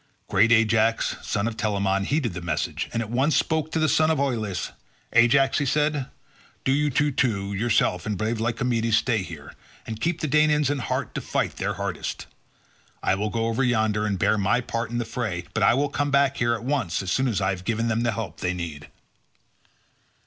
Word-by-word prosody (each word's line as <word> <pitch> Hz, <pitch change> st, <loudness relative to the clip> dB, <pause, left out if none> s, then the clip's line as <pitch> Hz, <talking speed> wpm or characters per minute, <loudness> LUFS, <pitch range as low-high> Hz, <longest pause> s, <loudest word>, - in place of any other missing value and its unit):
Great 105 Hz, +4 st, +3 dB
Ajax 115 Hz, 0 st, +3 dB
son 100 Hz, +2 st, -1 dB
of 115 Hz, -, -3 dB
Telamon 100 Hz, -2 st, 0 dB
heeded 140 Hz, -, 0 dB
the 90 Hz, -, -6 dB
message, 80 Hz, -3 st, -2 dB
and 115 Hz, -, -1 dB
at 110 Hz, -, -9 dB
once 135 Hz, +6 st, +2 dB
spoke 160 Hz, 0 st, 0 dB
to -, -, -1 dB
the 155 Hz, -1 st, +2 dB
son 155 Hz, +1 st, +3 dB
of 160 Hz, -3 st, +1 dB
Oileus. 115 Hz, -9 st, -2 dB, 0.4 s
"Ajax," 135 Hz, +5 st, +4 dB
said 150 Hz, +2 st, +2 dB
he, 145 Hz, -, -1 dB, 0.6 s
"do 130 Hz, -, +3 dB
you 150 Hz, +2 st, +2 dB, 0.2 s
two, 100 Hz, -7 st, 0 dB
yourself 100 Hz, -4 st, +1 dB
and 105 Hz, -2 st, -1 dB
brave 110 Hz, +3 st, -1 dB
Lycomedes, 115 Hz, -1 st, +1 dB
stay 115 Hz, -4 st, +1 dB
here 80 Hz, -6 st, -9 dB, 0.3 s
and 110 Hz, -1 st, -6 dB
keep 165 Hz, 0 st, 0 dB
the 155 Hz, -, -2 dB
Danaans 150 Hz, -1 st, +3 dB
in 145 Hz, -, -1 dB
heart 120 Hz, -, -3 dB
to -, -, -3 dB
fight -, -, -2 dB
their -, -, -2 dB
hardest. -, -, -4 dB, 0.8 s
I -, -, +2 dB
will 105 Hz, +2 st, -1 dB
go 115 Hz, +1 st, -1 dB
over 115 Hz, +3 st, 0 dB
yonder, 110 Hz, -3 st, +1 dB
and 100 Hz, -2 st, -1 dB
bear 105 Hz, -, +2 dB
my 100 Hz, +5 st, +2 dB
part 115 Hz, -2 st, -3 dB
in 120 Hz, -, -3 dB
the 120 Hz, -, -1 dB
fray, 110 Hz, -6 st, -3 dB
but -, -, -1 dB
I -, -, +5 dB
will 145 Hz, +2 st, +1 dB
come 145 Hz, 0 st, -1 dB
back 140 Hz, 0 st, +2 dB
here 120 Hz, 0 st, +2 dB
at 115 Hz, -, -8 dB
once 120 Hz, -, -1 dB
as 90 Hz, -, -3 dB
soon 130 Hz, +6 st, +2 dB
as 110 Hz, -5 st, 0 dB
I 95 Hz, 0 st, +1 dB
have 90 Hz, -1 st, -5 dB
given 115 Hz, +2 st, -1 dB
them 115 Hz, 0 st, 0 dB
the 120 Hz, -1 st, +1 dB
help 115 Hz, +1 st, -5 dB
they 90 Hz, 0 st, -1 dB
need." 80 Hz, -4 st, -6 dB
115 Hz, 205 wpm, -25 LUFS, 100-135 Hz, 0.8 s, I